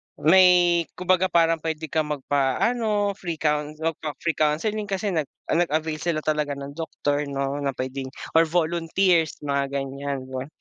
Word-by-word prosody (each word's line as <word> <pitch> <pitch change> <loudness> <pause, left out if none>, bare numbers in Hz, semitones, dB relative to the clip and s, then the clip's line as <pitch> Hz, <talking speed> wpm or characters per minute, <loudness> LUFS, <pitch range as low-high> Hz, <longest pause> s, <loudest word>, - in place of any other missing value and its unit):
may 175 0 +5
kumbaga 185 +1 +2
parang 165 -2 +3
puwede 160 0 -4
kang 155 -2 +1
magpaano, 205 - +1
free 170 -3 -3
coun 150 0 -1
magpa-free 160 0 -3
counseling 205 +8 0
kasi 195 +1 -1
nag 155 -5 -1 0.2
nag-avail 160 -2 0
sila 165 -3 -1
talaga 150 -2 0
ng 140 0 -7
doktor 145 -2 -2
'no, 140 0 -2
na 140 -2 -2
puwedeng 130 +1 -4 0.3
or 165 0 +5
volunteers, 170 0 +1
mga 140 -1 0
ganiyan 140 0 -3
ba. 130 +1 -4
155 Hz, 140 wpm, -24 LUFS, 145-175 Hz, 0.3 s, may